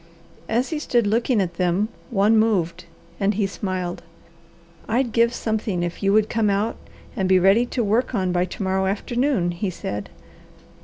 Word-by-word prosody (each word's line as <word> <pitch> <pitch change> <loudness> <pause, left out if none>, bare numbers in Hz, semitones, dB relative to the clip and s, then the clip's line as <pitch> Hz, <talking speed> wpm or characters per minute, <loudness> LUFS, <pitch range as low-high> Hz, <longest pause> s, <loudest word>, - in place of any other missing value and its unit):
As 240 +4 +1
he 315 - -2
stood 240 -6 +1
looking 230 +3 +1
at 175 -3 -2
them 180 +3 +1 0.2
one 215 -1 +3
moved 210 -7 +1 0.3
and 200 0 +1
he 205 0 +1
smiled. 185 -2 -4 0.9
"I'd 240 +2 +1
give 235 +1 +3
something 220 -6 -2
if 175 -1 -4
you 195 -1 +2
would 215 +1 +4
come 220 -2 +1
out 200 +3 0 0.4
and 190 -5 0
be 190 - +6
ready 195 +6 +4
to 245 -1 -1
work 225 +4 +1
on 185 -3 0
by 180 0 +1
to 185 - -6
morrow 190 0 0
afternoon," 230 -1 0
he 185 +3 -3
said. 105 - -5
205 Hz, 170 wpm, -23 LUFS, 185-230 Hz, 0.9 s, be